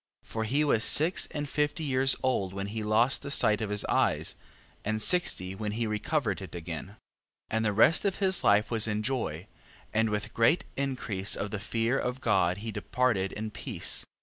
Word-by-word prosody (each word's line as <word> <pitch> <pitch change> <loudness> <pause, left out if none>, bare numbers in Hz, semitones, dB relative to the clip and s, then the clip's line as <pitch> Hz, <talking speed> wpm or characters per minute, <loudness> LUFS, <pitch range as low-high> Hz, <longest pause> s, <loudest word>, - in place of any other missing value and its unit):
For 110 0 -4
he 140 +7 +1
was 115 -7 +2
six 165 +5 +4
and 145 -1 -5
fifty 150 +3 -1
years 135 -2 +4
old 100 -8 0
when 100 0 -4
he 110 - -3
lost 110 +5 +2
the 140 - -7
sight 110 -6 +2
of 110 - -3
his 105 0 -1
eyes, - - 0 0.5
and 110 +1 -2
sixty 110 - +1
when 105 +1 -4
he 115 +1 -2
recovered 105 - -1
it 90 -3 -9
again. 85 -1 -6
14:4. 100 - -16 0.6
And 110 0 0
the 105 - +1
rest 115 +10 +4
of 200 -2 0
his 190 -2 +1
life 105 +2 +3
was 115 -1 +2
in 105 0 -2
joy, 105 - -3 0.5
and 110 +1 +2
with 105 0 -3
great 115 +9 +2
increase 125 -8 -1
of 100 - -4
the 110 - -3
fear 115 +4 -1
of 125 +1 -3
God 90 -7 +1
he 110 - -3
departed 110 -6 -1
in 110 +1 -5
peace. - - +1
14:5. - - -2
110 Hz, 200 wpm, -28 LUFS, 105-135 Hz, 0.6 s, six